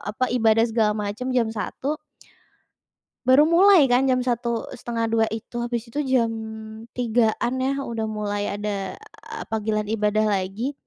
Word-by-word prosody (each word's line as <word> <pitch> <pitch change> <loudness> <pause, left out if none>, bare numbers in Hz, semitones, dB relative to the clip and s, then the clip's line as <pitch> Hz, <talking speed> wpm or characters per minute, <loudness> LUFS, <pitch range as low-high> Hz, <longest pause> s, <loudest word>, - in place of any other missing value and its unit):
apa, 255 - +1
ibadah 225 -1 +4
segala 220 -2 +2 0.2
macam 250 +5 -5
jam 235 -2 +3
01.00 275 +7 -3 1.3
baru 270 +3 +7
mulai 360 -2 +6
kan 250 +2 +4
jam 255 0 +2
01.00, 235 -2 -2
01:30 230 -2 0
itu, 230 +2 -8
habis 240 -1 -2
itu 285 +6 -3
jam 245 -3 +2 0.7
03.00-an 240 0 +1
ya, 270 - +1
udah 225 -2 -3
mulai 205 -1 -2
ada 205 -2 -4 0.6
panggilan 215 -1 0
ibadah 215 0 +1
lagi, 200 +6 -1
230 Hz, 135 wpm, -23 LUFS, 215-250 Hz, 1.3 s, baru